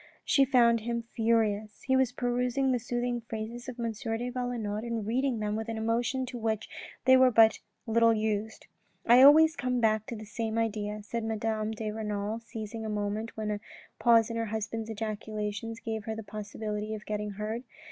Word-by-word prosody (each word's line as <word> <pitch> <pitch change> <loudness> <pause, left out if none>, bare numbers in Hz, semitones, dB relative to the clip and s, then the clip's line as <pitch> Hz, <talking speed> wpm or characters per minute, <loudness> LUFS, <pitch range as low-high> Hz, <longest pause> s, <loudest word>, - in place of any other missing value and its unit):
She 275 - +4
found 235 -3 +4
him 235 +1 -3
furious. 220 -2 +1
He 265 - +2
was 260 -2 +3
perusing 250 +2 0
the 250 - +1
soothing 240 +1 -2
phrases 230 +3 -5
of 250 -1 -8
M. 230 -1 -1
de 225 +2 -3
Valenod 240 -4 -3
and 230 -3 -3
reading 250 +3 0
them 210 -1 -2
with 220 +1 -4
an 225 - -3
emotion 235 +4 0
to 245 -1 -7
which 220 -1 -1 0.4
they 260 0 +8
were 260 0 +6
but 225 -3 +5 0.3
little 230 0 +4
used. 215 0 -2 0.2
" - - -40
I 240 +2 +7
always 315 +4 +8
come 250 -4 -1
back 220 -2 +2
to 235 - -5
the 215 0 -8
same 220 +1 -3
idea," 210 -2 -2
said 230 +2 -4
Madame 220 -1 -1
de 220 -1 -3
Renal 210 0 -3
seizing 225 -1 -7
a 220 - -3
moment 210 +2 -3
when 215 -1 -2
a 205 - -2 0.4
pause 230 -1 +5
in 230 - -3
her 230 - 0
husband's 220 +1 -4
ejaculations 215 0 -4
gave 220 -2 -4
her 220 - -3
the 225 - -6
possibility 210 0 -5
of 210 - -10
getting 210 -1 -3
heard. 215 +4 -4
225 Hz, 190 wpm, -29 LUFS, 215-240 Hz, 0.4 s, they